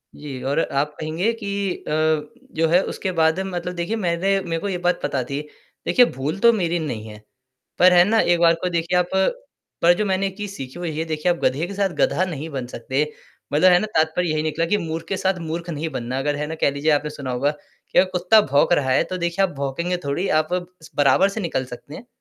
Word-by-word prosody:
जी 140 Hz, -3 st, -7 dB
और 140 Hz, -, +1 dB
आप 150 Hz, -1 st, -1 dB
कहेंगे 160 Hz, +8 st, 0 dB
कि 200 Hz, -1 st, -2 dB, 0.2 s
अ, -, -, -3 dB, 0.7 s
जो 165 Hz, 0 st, +2 dB
है 175 Hz, +3 st, +4 dB
उसके 190 Hz, -, -3 dB
बाद 160 Hz, 0 st, +2 dB
मतलब 180 Hz, -2 st, -3 dB
देखिए 175 Hz, +6 st, -2 dB
मैंने 195 Hz, 0 st, +1 dB
मेरे 165 Hz, -3 st, -3 dB
को 200 Hz, -, -3 dB
ये 185 Hz, -, -1 dB
बात 180 Hz, -, +2 dB
पता 140 Hz, -3 st, -1 dB
थी। 140 Hz, +4 st, -4 dB, 0.5 s
देखिए 250 Hz, -, +6 dB
भूल 140 Hz, +8 st, -3 dB
तो 235 Hz, +3 st, +6 dB
मेरी 175 Hz, -5 st, 0 dB
नहीं 120 Hz, -9 st, -4 dB
है। 105 Hz, 0 st, -11 dB, 0.6 s
पर 180 Hz, 0 st, +7 dB
है 175 Hz, 0 st, +7 dB
ना 225 Hz, 0 st, +3 dB
एक 175 Hz, -1 st, +2 dB
बार 170 Hz, -1 st, +6 dB
को 180 Hz, -, +1 dB
देखिए 170 Hz, +1 st, 0 dB
आप 180 Hz, -, +1 dB, 0.8 s
पर 175 Hz, +1 st, +7 dB
जो 210 Hz, -, 0 dB
मैंने 195 Hz, 0 st, +1 dB
एक 190 Hz, 0 st, -8 dB
चीज़ 205 Hz, -2 st, -5 dB
सीखी 135 Hz, +2 st, -8 dB
हुई 165 Hz, -3 st, -4 dB
है 160 Hz, -, 0 dB
देखिए 160 Hz, +2 st, 0 dB
आप 175 Hz, -, -1 dB
गधे 150 Hz, +6 st, +1 dB
के 200 Hz, -, -7 dB
साथ 200 Hz, -1 st, +1 dB
गधा 185 Hz, -, +2 dB
नहीं 160 Hz, -3 st, -5 dB
बन 135 Hz, -4 st, -4 dB
सकते। 130 Hz, +4 st, -2 dB, 0.5 s
मतलब 180 Hz, +5 st, +6 dB
है 175 Hz, -, +6 dB
ना 215 Hz, -, -1 dB
तात्पर्य 160 Hz, +2 st, +1 dB
यही 155 Hz, 0 st, 0 dB
निकला 160 Hz, +1 st, 0 dB
कि 205 Hz, +5 st, +1 dB
मूर्ख 165 Hz, -3 st, -4 dB
के 195 Hz, -, -2 dB
साथ 190 Hz, -1 st, 0 dB
मूर्ख 165 Hz, +2 st, -5 dB
नहीं 160 Hz, 0 st, -3 dB
बनना 125 Hz, -3 st, -4 dB
अगर 145 Hz, +2 st, 0 dB
है 150 Hz, +1 st, -3 dB
ना 160 Hz, -, -4 dB
कह -, -, +4 dB
लीजिए 140 Hz, +3 st, 0 dB
आपने 150 Hz, 0 st, +1 dB
सुना 140 Hz, -4 st, -6 dB
होगा 135 Hz, +4 st, +1 dB, 0.4 s
कि 185 Hz, -, +5 dB
कुत्ता 180 Hz, +5 st, +5 dB
भौंक 145 Hz, 0 st, +2 dB
रहा 135 Hz, -5 st, +1 dB
है 130 Hz, -, +4 dB
तो -, -, -1 dB
देखिए 175 Hz, +2 st, 0 dB
आप 180 Hz, -, -6 dB
भौंकेंगे 155 Hz, +6 st, -2 dB
थोड़ी 145 Hz, +7 st, -1 dB
आप 155 Hz, +3 st, -7 dB, 0.4 s
बराबर 145 Hz, +7 st, +4 dB
से 200 Hz, -, -5 dB
निकल 160 Hz, -7 st, -2 dB
सकते 125 Hz, +4 st, -10 dB
हैं। 240 Hz, -, -11 dB
165 Hz, 235 wpm, -22 LUFS, 145-180 Hz, 0.8 s, पर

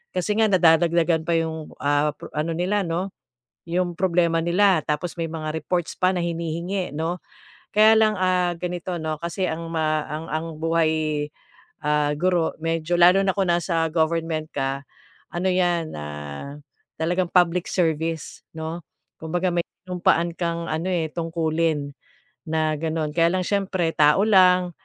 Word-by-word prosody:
kasi 185 Hz, +3 st, 0 dB
nga 220 Hz, -, +5 dB
nadadagdagan 165 Hz, -2 st, +4 dB
pa 170 Hz, -, +2 dB
'yong, 160 Hz, -1 st, -3 dB
ah, 145 Hz, +1 st, +2 dB
pro -, -, -10 dB
ano 155 Hz, +2 st, -1 dB
nila 185 Hz, +5 st, 0 dB
no, 180 Hz, +3 st, -2 dB, 0.6 s
'yung 175 Hz, +1 st, 0 dB
problema 170 Hz, -3 st, +2 dB
nila. 180 Hz, +1 st, +3 dB
Tapos 165 Hz, +4 st, -2 dB
may 165 Hz, -, -1 dB
mga 155 Hz, -1 st, -4 dB
reports 165 Hz, +2 st, -2 dB
pa 185 Hz, +1 st, +4 dB
na 175 Hz, -, 0 dB
hinihingi 170 Hz, +2 st, -3 dB
'no, 165 Hz, +3 st, -2 dB, 0.5 s
kaya 215 Hz, +1 st, +7 dB
lang, 215 Hz, -1 st, +4 dB
ah, 180 Hz, -1 st, +1 dB
ganito 180 Hz, 0 st, -4 dB
'no 155 Hz, -1 st, -2 dB
kasi 175 Hz, +2 st, -2 dB
ma 160 Hz, -2 st, -1 dB
ang 155 Hz, +2 st, -5 dB
ang 160 Hz, +2 st, -2 dB
buhay, 155 Hz, -2 st, +1 dB, 0.6 s
ah, 150 Hz, 0 st, +1 dB
guro 175 Hz, 0 st, +1 dB
medyo 165 Hz, +1 st, 0 dB
lalo 180 Hz, +3 st, +7 dB
na 190 Hz, -, +2 dB
kung 190 Hz, -3 st, 0 dB
nasa 170 Hz, -1 st, +1 dB
government 160 Hz, -1 st, 0 dB
ka, 135 Hz, 0 st, -2 dB, 0.5 s
ano 175 Hz, +2 st, -2 dB
'yan 175 Hz, -3 st, +1 dB, 1.1 s
talagang 175 Hz, +2 st, 0 dB
public 180 Hz, -1 st, +3 dB
service 160 Hz, -2 st, -1 dB
'no. 160 Hz, +2 st, -5 dB, 0.4 s
Kumbaga 175 Hz, +3 st, -1 dB
may 170 Hz, -, +2 dB, 0.2 s
sinumpaan 170 Hz, -2 st, +1 dB
kang 170 Hz, -1 st, -2 dB
ano, 165 Hz, +4 st, -2 dB
eh, 170 Hz, -3 st, 0 dB
tungkulin 160 Hz, -3 st, -1 dB, 0.5 s
na 155 Hz, -1 st, +1 dB
ganon. 160 Hz, -1 st, -2 dB
Kaya 165 Hz, -1 st, +4 dB
lang 185 Hz, -, 0 dB
siyempre 190 Hz, -4 st, 0 dB
tao 150 Hz, +6 st, +4 dB
lang, 185 Hz, -3 st, +5 dB
170 Hz, 145 wpm, -23 LUFS, 160-180 Hz, 1.1 s, kaya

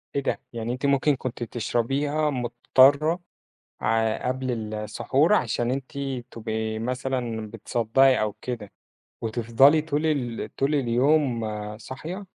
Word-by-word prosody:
إيه 140 Hz, -, +1 dB
ده؟! -, -, -1 dB
يعني 115 Hz, +1 st, -3 dB
أنتِ 130 Hz, +3 st, -4 dB
ممكن 140 Hz, +1 st, +3 dB
كنتِ 125 Hz, -2 st, -5 dB
تشربيها 135 Hz, +7 st, 0 dB
مُضطرة 135 Hz, +5 st, +3 dB, 0.6 s
ع 110 Hz, 0 st, +1 dB
قبل 125 Hz, -4 st, -2 dB
السحور 130 Hz, -, +1 dB
علشان 120 Hz, -, 0 dB
أنتِ 135 Hz, +1 st, -4 dB, 0.4 s
تبقي 110 Hz, -1 st, -3 dB
مثلًا 120 Hz, -2 st, -3 dB
بتصدّعي 125 Hz, +5 st, +2 dB
أو 105 Hz, -1 st, 0 dB
كده، 115 Hz, -5 st, -5 dB, 0.5 s
وتفضلي 120 Hz, +6 st, +4 dB
طول 155 Hz, 0 st, -1 dB
ال 125 Hz, -7 st, -2 dB
طول 140 Hz, +2 st, +1 dB
اليوم 130 Hz, 0 st, +2 dB, 0.4 s
صاحية؟ 165 Hz, -, -7 dB
125 Hz, 115 wpm, -25 LUFS, 115-140 Hz, 0.6 s, وتفضلي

